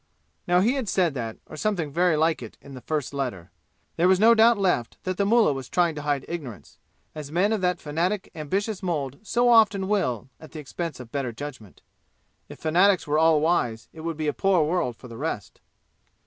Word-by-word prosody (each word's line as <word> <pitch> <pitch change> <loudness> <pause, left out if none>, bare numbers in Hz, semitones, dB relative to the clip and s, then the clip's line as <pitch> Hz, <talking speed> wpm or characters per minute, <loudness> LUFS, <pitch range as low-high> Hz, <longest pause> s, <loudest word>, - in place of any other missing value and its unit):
Now 180 +1 +4
he 230 +6 +3
had 260 -7 -2
said 175 -5 +2
that, 115 -4 -5
or - - -11
something 175 -4 -1
very 175 +1 +2
like 160 -1 +1
it, 115 - -10
in 140 - -13
the 130 - -9
first 150 -1 -3
letter. 125 -11 -4 0.5
There 175 - +4
was 185 0 +4
no 225 +3 +7
doubt 230 0 +5
left 180 - 0
that 185 -1 -3
the 200 - +1
Mullah 225 -7 +4
was 135 -2 -7
trying 175 -2 +2
to 150 - -6
hide 145 -2 -1
ignorance, 145 - -8 0.3
as 150 -2 -8
men 190 +6 +2
of 215 - -1
that 180 -1 0
fanatic 175 +7 -2
ambitious 195 +7 -3
mold 150 -7 -3
so 240 +3 +1
often 215 -5 +4
will 130 - -1
at 155 - -14
the 155 - -7
expense 150 0 -5
of 120 -2 -10
better 135 -4 -2
judgment. 120 -5 -9 0.7
If - - -10
fanatics 180 +4 +3
were 150 +1 +1
all 160 -2 +4
wise, 120 -9 0
it 160 - -10
would 165 -1 -4
be 155 -1 -2
a 150 - +1
poor 195 -4 +2
world 155 -6 -1
for 125 - -13
the 115 -1 -10
rest. 130 - -5
160 Hz, 210 wpm, -25 LUFS, 140-190 Hz, 0.7 s, no